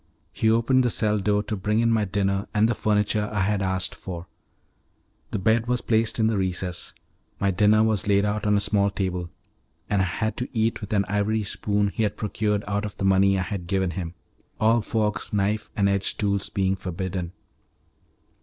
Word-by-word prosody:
He 110 - +1
opened 115 +4 +3
the 125 - +2
cell 105 -1 +1
door 105 +1 +1
to 110 - -3
bring 105 +3 0
in 115 0 +3
my 110 -2 +2
dinner 100 0 -1
and 105 +1 +4
the 120 - +1
furniture 105 -1 +1
I 105 -2 0
had 100 +1 +1
asked 95 -1 -1
for. 85 -2 -7 1.0
The - - -2
bed 110 +4 +2
was 125 0 0
placed 110 -1 +1
in 110 - +2
the 110 -2 +1
recess; 90 -1 -3 0.4
my 100 0 +2
dinner 105 +3 +4
was 110 -3 +1
laid 100 0 +3
out 105 +1 -1
on 105 0 +4
a - - +1
small 100 -1 +2
table, 90 -3 -3 0.6
and 100 -2 +3
I - - +2
had 110 +5 -2
to 125 - -3
eat 115 +1 +1
with 105 - -7
an 100 -2 +2
ivory 105 +2 0
spoon 100 0 0
he 105 - -4
had 105 -2 0
procured 105 -1 -1
out 100 0 -1
of 105 - -6
the 95 - -2
money 95 0 +4
I 95 - 0
had 95 -3 -5
given 95 -1 0
him; 85 0 -5 0.4
all 115 +2 +4
forks, 105 -1 -1
knives, 105 +1 0
and 100 -1 +2
edged 100 0 0
tools 100 -1 0
being 95 -1 0
forbidden. 90 -1 -4
105 Hz, 200 wpm, -25 LUFS, 95-110 Hz, 1.0 s, and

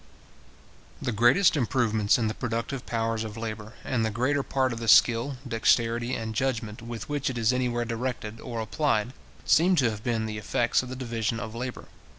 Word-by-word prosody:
The 125 - -2
greatest 120 - +4
improvements 115 -6 +2
in 115 - 0
the 110 - -1
productive 120 +3 -4
powers 115 -1 -1
of 110 0 -7
labour, 110 -1 -6
and 120 -3 0
the 110 - +1
greater 130 +6 0
part 130 -2 0
of 115 - -6
the 115 - -5
skill, 120 +5 +5
dexterity, 120 +1 +2
and 110 -1 -4
judgment, 115 -3 -2
with 115 -1 -7
which 145 -2 -1
it 125 - -4
is 115 +1 +2
anywhere 120 -2 0
directed, 115 -2 -4
or 115 -2 -5
applied, 120 -1 0 0.3
seem 180 +4 +4
to 130 -8 +3
have 105 -1 -8
been 115 -3 0
the 105 -1 -4
effects 120 +3 +1
of 130 - -8
the 130 - -5
division 115 -3 -2
of 110 -2 -6
labour. 125 +2 -5
115 Hz, 185 wpm, -27 LUFS, 110-125 Hz, 0.3 s, skill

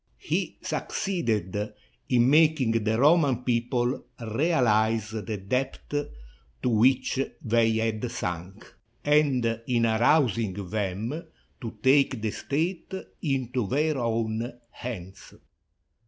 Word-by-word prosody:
He - - -2
suc - - -3
ceeded 105 - -1 0.4
in 120 -1 +4
making 150 -4 +4
the 110 0 +1
Roman 140 -4 +4
people 120 +1 0 0.2
realize 115 - +1
the 110 -1 -4
depth 125 +8 -3 0.7
to - - +2
which 125 +4 +3 0.2
they 115 -1 +3
had 110 +1 -1
sunk 90 -3 -5 0.3
and 130 -6 +2
in 120 -2 +2
arousing 115 -2 +3
them 105 - -3 0.3
to 115 -3 -6
take 135 -1 +4
the 110 -1 -2
state 165 - -2 0.3
into 130 - -1
their 150 +5 +1
own 115 0 -1 0.2
hands. 95 -6 -8
115 Hz, 105 wpm, -27 LUFS, 110-135 Hz, 0.7 s, in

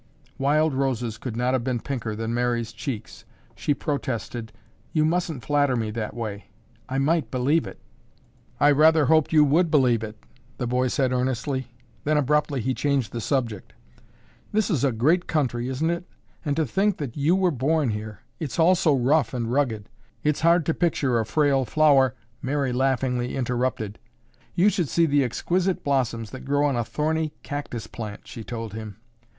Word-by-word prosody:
Wild 150 +2 +2
roses 125 -4 -1
could 115 -4 -5
not 125 +1 +1
have 130 -2 +1
been 125 -1 -1
pinker 115 -4 -4
than 115 +1 -3
Mary's 120 -1 0
cheeks. 115 -4 -6 0.3
She 145 - 0
protested, 120 -6 -3 0.4
"You 155 -1 +3
mustn't 165 -5 -1
flatter 145 -3 +2
me 110 -2 -1
that 110 0 -4
way. 105 -4 -5 0.4
I 130 - -2
might 145 -2 +1
believe 130 +1 +1
it." 95 - -10 0.8
"I 145 +1 +6
rather 155 +1 +5
hoped 155 +1 +3
you 155 -2 +6
would 160 +4 +3
believe 125 -7 +3
it," 105 -1 -7 0.4
the - - -2
boy 125 +1 +1
said 130 0 +1
earnestly, 130 +1 -1 0.4
then 150 0 +2
abruptly 145 -1 +1
he 130 +4 0
changed 140 -6 0
the 120 - -4
subject. 115 -5 -2 0.8
"This 215 0 +1
is 145 -7 +1
a 135 - +3
great 155 +11 +2
country, 125 -5 0
isn't 150 +6 0
it? 170 +1 -4 0.4
And 145 -4 -1
to 160 - +1
think 195 - +1
that 140 -6 -5
you 150 +5 +2
were 190 -2 +2
born 145 0 +1
here. 105 0 -6 0.2
It's 155 -5 -4
all 170 +2 +5
so 160 -5 +3
rough 135 +3 +2
and 115 -1 -2
rugged, 120 -6 0 0.4
it's 150 -1 +1
hard 170 0 +4
to 165 - +1
picture 140 -9 +1
a 110 - -2
frail 140 -3 +2
flower—" 135 -1 +4 0.3
Mary 135 -1 -1
laughingly 125 -1 0
interrupted. 125 -4 -2 0.6
"You 190 +4 +5
should 180 -8 -1
see 170 - +3
the 145 -2 +3
exquisite 180 - -1
blossoms 120 -6 0
that 130 - -8
grow 145 +1 +1
on 140 -3 +1
a 120 - 0
thorny 155 +4 -1
cactus 140 -7 -5
plant," 110 -1 -8
she 115 - -8
told 115 -2 -6
him. 110 -3 -7
135 Hz, 175 wpm, -25 LUFS, 120-150 Hz, 0.8 s, I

